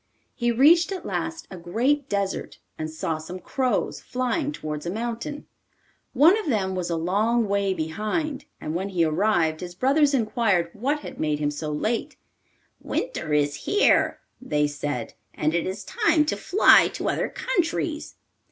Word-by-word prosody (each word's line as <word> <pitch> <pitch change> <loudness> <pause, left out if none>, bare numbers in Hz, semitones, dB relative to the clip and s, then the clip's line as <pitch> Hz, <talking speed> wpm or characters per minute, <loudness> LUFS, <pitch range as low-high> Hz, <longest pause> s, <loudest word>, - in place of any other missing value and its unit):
He 240 -2 0
reached 320 - +5
at 380 - -5
last 325 0 -3
a 190 - -7
great 250 +12 0
desert, 200 -1 -2 0.2
and 155 0 -4
saw 160 0 -3
some 165 +4 -7
crows 255 +6 -1
flying 255 +4 -1
towards 155 - -5
a - - 0
mountain. 235 +8 -4 0.7
One 310 +8 +6
of 425 - -5
them 195 -6 0
was 180 -2 -3
a 170 - 0
long 210 +7 +1
way 200 -1 +1
behind, 215 - -2
and 155 - -4
when 190 +4 -2
he 175 -4 +2
arrived 160 -1 +1
his 175 -1 -7
brothers 280 - +3
inquired 215 -8 +1
what 280 +7 -1
had - - -9
made 150 -1 0
him 145 0 -1
so 150 +1 -4
late. 215 +10 -2 0.6
'Winter 485 - -3
is 145 -1 +2
here,' 410 - +2 0.2
they 150 -12 +1
said, 145 -5 -4 0.2
'and 155 +1 0
it 170 +1 0
is 190 - -4
time 330 -9 +2
to 300 - 0
fly 395 - +5
to - - -3
other - - 0
countries. 330 -3 -2
205 Hz, 160 wpm, -25 LUFS, -, 0.7 s, One